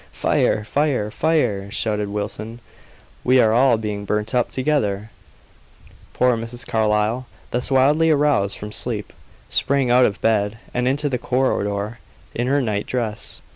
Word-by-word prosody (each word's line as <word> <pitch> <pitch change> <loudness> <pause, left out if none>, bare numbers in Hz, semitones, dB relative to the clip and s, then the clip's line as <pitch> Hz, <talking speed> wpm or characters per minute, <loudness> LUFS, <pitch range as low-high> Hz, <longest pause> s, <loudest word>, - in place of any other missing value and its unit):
"Fire! 105 - +1
fire! 130 -3 0
fire!" 115 -13 0
shouted 105 -2 -1
Wilson; 105 +3 -4 0.6
"we 130 +1 +4
are 110 -2 +4
all 125 0 +4
being 105 -2 -4
burnt 105 +1 -2
up 125 -1 +1
together!" 110 -7 -1 1.0
Poor 125 -1 +3
Mrs. 115 +2 -6
Carlyle, 110 +3 0 0.2
thus 125 +1 0
wildly 145 +5 +4
aroused 145 -10 +2
from 105 0 -7
sleep, 110 -3 -2 0.3
sprang 135 -3 +1
out 125 +1 +6
of 100 - -1
bed 105 -1 +1 0.2
and 125 0 0
into 145 +3 +1
the 125 -3 -1
corridor 110 -4 -1 0.3
in 120 +1 -2
her 140 +1 +2
night 105 -3 -2
dress. 115 -4 -3
115 Hz, 140 wpm, -21 LUFS, 105-130 Hz, 1.0 s, out